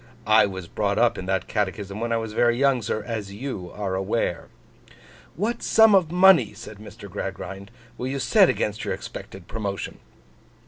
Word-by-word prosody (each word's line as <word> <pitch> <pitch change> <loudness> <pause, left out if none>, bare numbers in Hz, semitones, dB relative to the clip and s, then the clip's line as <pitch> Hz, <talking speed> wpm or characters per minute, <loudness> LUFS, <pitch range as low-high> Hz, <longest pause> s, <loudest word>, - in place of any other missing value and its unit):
I 110 -1 +5
was 95 -3 -7
brought 100 +3 -1
up 120 +1 +2
in 95 - -6
that 95 -1 -1
catechism 100 0 -3
when 115 +1 -2
I 115 - +2
was 110 -1 -4
very 120 +1 +2
young, 135 -2 +3
sir, 110 0 -3
as 105 -3 -4
you 100 -5 -6
are 100 -2 -4
aware.' 95 -1 -1 0.9
'What 230 +6 -2
sum 220 -1 +5
of 180 -5 +4
money,' 180 - +5
said 110 -1 -10
Mr. 105 - -11
Gradgrind, 100 +1 -6 0.3
'will 125 - -2
you 135 +1 -2
set 195 - +4
against 105 0 -1
your - - -2
expected 95 -2 -10
promotion? 100 -3 -5
110 Hz, 175 wpm, -24 LUFS, 100-130 Hz, 0.9 s, I